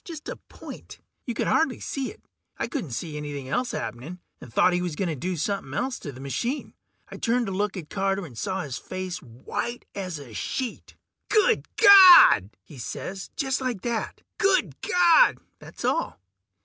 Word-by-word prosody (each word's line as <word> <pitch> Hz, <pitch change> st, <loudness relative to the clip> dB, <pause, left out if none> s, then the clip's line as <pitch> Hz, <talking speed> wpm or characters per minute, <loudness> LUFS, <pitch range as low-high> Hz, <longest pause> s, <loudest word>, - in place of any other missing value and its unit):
Just 320 Hz, -3 st, -9 dB
a -, -, -4 dB
point; -, -, -12 dB, 0.3 s
you 240 Hz, -, -3 dB
could -, -, -1 dB
hardly 320 Hz, -6 st, +1 dB
see 270 Hz, -2 st, -4 dB
it. 435 Hz, -, -19 dB, 0.3 s
I -, -, -1 dB
couldn't 250 Hz, -, -4 dB
see 150 Hz, +5 st, -5 dB
anything 145 Hz, -3 st, -6 dB
else 250 Hz, -, -1 dB
happening, 145 Hz, +10 st, -6 dB, 0.2 s
and 120 Hz, -, -11 dB
thought 180 Hz, -, +3 dB
he 180 Hz, -, 0 dB
was 175 Hz, -4 st, -3 dB
gonna 170 Hz, -4 st, -2 dB
do 180 Hz, +6 st, -3 dB
somepin' 160 Hz, -4 st, -3 dB
else 255 Hz, -, -2 dB
to 145 Hz, -, -7 dB
the 130 Hz, -, -12 dB
machine. 140 Hz, -, -3 dB, 0.4 s
I -, -, -9 dB
turned 240 Hz, +1 st, 0 dB
to 195 Hz, -, -4 dB
look 200 Hz, +1 st, -2 dB
at 160 Hz, -4 st, -8 dB
Carter, 195 Hz, -1 st, -1 dB
and 135 Hz, -7 st, -12 dB
saw 190 Hz, -, -3 dB
his 140 Hz, -4 st, -5 dB
face 185 Hz, -1 st, -6 dB
was 125 Hz, -, -16 dB
white 240 Hz, +1 st, -4 dB
as 185 Hz, -5 st, -5 dB
a 135 Hz, -6 st, -11 dB
sheet. 250 Hz, -, -5 dB, 0.3 s
"Good 435 Hz, +2 st, +3 dB
Gawd!" 375 Hz, -, +9 dB
he 140 Hz, +4 st, -14 dB
says, 190 Hz, +10 st, -6 dB
just 265 Hz, -2 st, -1 dB
like 250 Hz, -7 st, -3 dB
that: 235 Hz, -2 st, -4 dB, 0.2 s
"Good 390 Hz, -2 st, +1 dB
Gawd!" 360 Hz, +7 st, +5 dB, 0.2 s
That's -, -, -9 dB
all. 330 Hz, -, -1 dB
195 Hz, 185 wpm, -25 LUFS, -, 0.4 s, Gawd